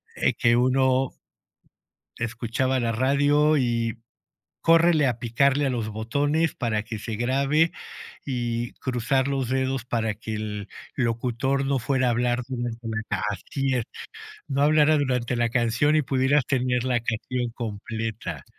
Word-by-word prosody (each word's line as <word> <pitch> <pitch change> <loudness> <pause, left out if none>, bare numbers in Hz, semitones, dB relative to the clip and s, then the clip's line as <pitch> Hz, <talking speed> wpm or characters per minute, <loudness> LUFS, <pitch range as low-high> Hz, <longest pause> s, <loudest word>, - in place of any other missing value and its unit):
eh, - - +1
que 120 0 +3
uno 130 +1 +2 1.1
escuchaba 120 +3 -1
la 115 -1 0
radio 145 +5 +3
y 115 -3 0 0.7
córrele 165 -3 +5
a 120 -2 0
picarle 140 +5 +2
a - - +1
los 115 -3 -2
botones 145 +9 0
para 110 -4 -1
que 110 -1 -6
se 110 0 -5
grabe 140 +7 +2 0.5
y 120 -3 -2
cruzar 130 +2 0
los 135 -3 -1
dedos 130 -1 -1
para 115 -3 -1
que 110 +1 -6
el 105 -1 -5 0.3
locutor 125 +2 0
no 135 -1 +1
fuera 130 +1 +1
a - - +3
hablar 120 +1 +1
durante 120 -2 -4
la 110 0 -2 0.3
así 135 +7 -2
es, 120 -3 0 0.6
no 140 -1 -1
hablara 155 0 +5
durante 125 -3 0
la 120 0 +1
canción 120 +6 +2
y 155 - +3
pudieras 135 +1 +2
tener 125 -2 0
la 125 -2 +1
canción 120 +1 -2
completa. 110 0 -5
125 Hz, 140 wpm, -25 LUFS, 115-135 Hz, 1.1 s, córrele